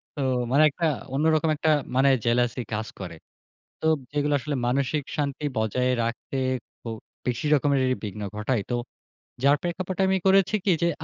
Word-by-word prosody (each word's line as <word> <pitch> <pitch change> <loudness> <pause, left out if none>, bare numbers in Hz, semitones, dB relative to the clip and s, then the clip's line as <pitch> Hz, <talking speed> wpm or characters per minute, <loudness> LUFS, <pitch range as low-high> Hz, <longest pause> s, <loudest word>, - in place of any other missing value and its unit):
তো 145 - -3 0.3
মানে 145 +3 +5
একটা 165 +4 -2 0.3
অন্যরকম 155 +2 +2
একটা 160 +2 0 0.3
মানে, 135 +1 +5 0.2
জেলাসি 120 +1 +2
কাজ 110 +1 -2
করে। 90 -3 -6 0.7
তো - - -2 0.3
যেগুলা 145 0 +1
আসলে 150 0 -3
মানসিক 140 +3 0
শান্তি 145 0 -2
বজায় 110 +4 +1
রাখতে 115 +4 -4 0.5
খুব 115 -1 -5 0.3
বেশি 125 +4 -1
রকমেরই 135 -3 +2
বিঘ্ন 105 +1 -5
ঘটায়। 105 +2 0
তো - - +1 0.7
যার 140 +1 +5
প্রেক্ষাপট 180 +1 -3
আমি 190 0 +2
করেছি 195 +2 +4
কী? 195 - +3
যে 170 - +4
140 Hz, 150 wpm, -25 LUFS, 120-155 Hz, 0.7 s, মানে